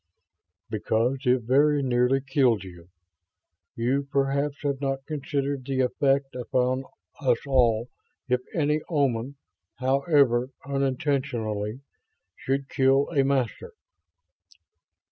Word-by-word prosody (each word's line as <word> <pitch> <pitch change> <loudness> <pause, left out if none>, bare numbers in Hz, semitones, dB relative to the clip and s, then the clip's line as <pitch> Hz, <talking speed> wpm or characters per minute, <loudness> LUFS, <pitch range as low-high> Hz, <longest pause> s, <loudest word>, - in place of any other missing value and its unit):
"Because 115 +5 0
it 125 -1 +3
very 145 +4 +3
nearly 125 +1 +2
killed 130 -6 +2
you. 85 -2 -12 0.9
You 135 +4 0
perhaps 140 +1 0
have 140 -1 -1
not 135 -1 -2
considered 140 -2 -2
the 130 0 -1
effect 135 +1 +1
upon 125 +1 -1 0.3
us 125 -4 +2
all 120 -4 +2 0.4
if 125 -1 +1
any 150 -1 +1
Oman, 140 -4 0 0.4
however 135 -2 +2 0.2
unintentionally, 130 -5 -1 0.5
should 135 +1 -2
kill 135 +1 +2
a 140 -4 +3
Master?" 135 -4 -1
135 Hz, 100 wpm, -26 LUFS, 125-140 Hz, 0.9 s, it